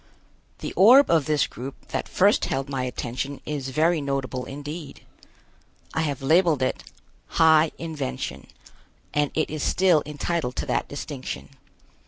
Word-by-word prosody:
The - - -4
orb 250 +9 +7
of 160 -4 +3
this 150 -2 +2
group 130 +3 -9
that - - -3
first 200 +3 +3
held 135 +1 -2
my 135 -2 -2
attention 130 +3 -4
is 140 -3 -3
very 155 +4 +2
notable 135 -2 -3
indeed. 145 +3 -8 0.9
I 160 - 0
have 145 -4 -2
labeled 160 -2 +3
it 130 - -1 0.5
"High 160 0 +6
Invention," 155 - -5 0.7
and 145 -1 +2
it 155 - 0
is 155 -1 -4
still 180 -2 +3
entitled 150 -3 -2
to - - -2
that - - -1
distinction. 130 - -6
145 Hz, 140 wpm, -25 LUFS, 135-160 Hz, 0.9 s, orb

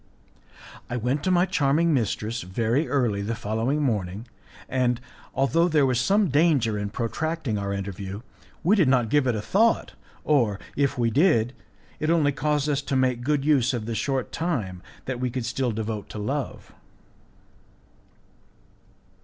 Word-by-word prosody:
I 120 - -2
went 125 +5 -1
to - - +2
my 180 0 +4
charming 165 -2 +2
mistress 115 -2 -1
very 115 - 0
early 120 -8 +1
the 110 +3 -2
following 115 +8 -1
morning, 105 -3 -2 0.4
and, 125 -2 +1 0.4
although 165 +6 +3
there 150 -4 +3
was 125 -3 +1
some 195 +8 +3
danger 145 -7 +3
in 105 0 -2
protracting 125 +2 -2
our 100 0 -3
interview, 100 +1 -5 0.4
we 190 +6 +4
did 180 -9 +3
not 125 -4 +3
give 145 -3 +3
it 120 - +1
a 105 - -3
thought, 220 - +2 0.3
or, 115 -9 +2 0.2
if 140 -1 +1
we 115 -2 +1
did, 125 - +3 0.5
it 155 - -1
only 160 -4 +3
caused 150 0 0
us 145 -2 +1
to 140 0 -3
make 130 -2 +1
good 145 +2 0
use 135 -4 +3
of 110 -3 -4
the 115 - -3
short 135 +2 -1
time 115 - -2 0.2
that 130 -2 -3
we 125 0 -1
could 120 -1 -3
still 125 0 -1
devote 110 -1 -4
to - - -8
love. 135 +7 -4
130 Hz, 160 wpm, -25 LUFS, 110-150 Hz, 0.5 s, my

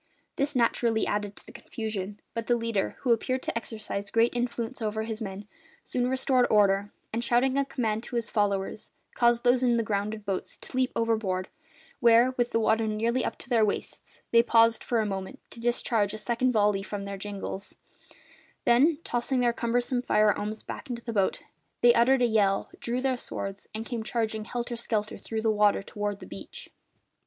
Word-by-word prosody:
This 280 +1 -1
naturally 230 -2 +2
added 205 -1 -2
to - - -14
the - - -12
confusion; 210 -2 -5
but 230 -1 -4
the 240 - +4
leader, 230 -4 -1
who 250 - +1
appeared 255 +3 +1
to - - -3
exercise 215 -3 -4
great 230 +1 +2
influence 240 0 -2
over 220 0 -1
his 220 0 -5
men, 200 -1 -6 0.4
soon 250 0 -1
restored 260 -1 +2
order 205 -1 +3 0.2
and, 230 +1 -1
shouting 245 +3 +2
a 280 - +3
command 220 -5 -1
to - - -7
his 230 -2 -2
followers, 205 -1 -1 0.2
caused 235 -1 +3
those 245 0 +4
in 240 -2 +3
the 230 - +1
grounded 210 0 -2
boats 195 -2 -3
to - - -9
leap 255 0 +2
overboard, 215 -5 0 0.5
where, 235 0 +6
with 245 -2 0
the 230 - +1
water 220 0 +2
nearly 230 +4 0
up - - -3
to - - -7
their 230 -3 +4
waists, 210 - -4
they 230 - +7
paused 230 -1 +4
for 235 -2 +1
a - - -1
moment 195 +6 -4
to - - -9
discharge 230 -3 0
a - - -5
second 240 +3 0
volley 205 -3 +2
from 200 0 -5
their 200 0 -5
jingals; 200 -1 -5 0.9
then, 280 +7 +5
tossing 245 +2 0
their 240 -1 +3
cumbersome 245 +1 0
firearms 210 -1 +1
back 305 - -7
into 235 -1 -5
the 230 - -4
boats, 195 -3 +1 0.4
they 240 0 +7
uttered 250 +2 +4
a - - +6
yell, 205 -4 +2
drew 245 +2 -2
their 260 -1 +1
swords, 195 -4 -6
and 220 +1 -4
came 235 -2 -3
charging 220 -1 -2
helter 240 +1 -4
skelter 215 -2 -2
through 220 -1 -4
the 220 - +3
water 210 -1 +3
toward 205 0 -4
the - - -9
beach. - - -9
230 Hz, 190 wpm, -28 LUFS, 210-240 Hz, 0.9 s, they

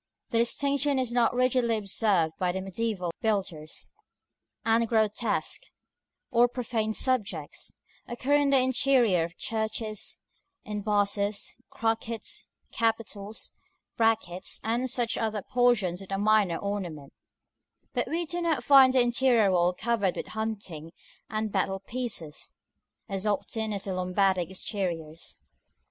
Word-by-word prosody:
(The 230 - +1
distinction 280 +4 +2
is 255 -2 0
not 240 -1 +3
rigidly 250 -2 +2
observed 195 -5 +1
by 180 -1 +1
the 190 - -3
mediæval 190 -1 -2
builders, 190 -8 -2 0.7
and 230 +1 +3
grotesques, 220 0 0 0.6
or 240 0 +5
profane 230 -3 -2
subjects, 200 - -2 0.3
occur 255 +4 -1
in 290 -1 +4
the 275 - +5
interior 255 -8 +3
of 170 +1 -11
churches, 220 -1 -2 0.5
in 210 -1 -4
bosses, 205 0 0 0.2
crockets, 225 0 -2 0.3
capitals, 225 -2 -2 0.4
brackets, 220 -6 +1
and 240 +3 0
such 240 -2 +1
other 215 -3 -1
portions 215 -8 +2
of 195 - -11
minor 205 -5 +3
ornament: 175 -9 -5 0.8
but - - 0
we 340 +2 -1
do 345 +2 -3
not 320 -7 0
find 265 -1 +7
the 260 - +5
interior 240 -4 +3
wall 175 -1 +3
covered 205 -1 0
with - - -5
hunting 200 -8 -5 0.4
and 215 -1 -2
battle 195 0 0
pieces, 200 -9 -4 0.6
as 195 0 -2
often 220 +2 -1
the 200 -2 -3
Lombardic 185 -1 +1
exteriors.) 175 -5 -4
220 Hz, 120 wpm, -28 LUFS, 190-240 Hz, 0.8 s, find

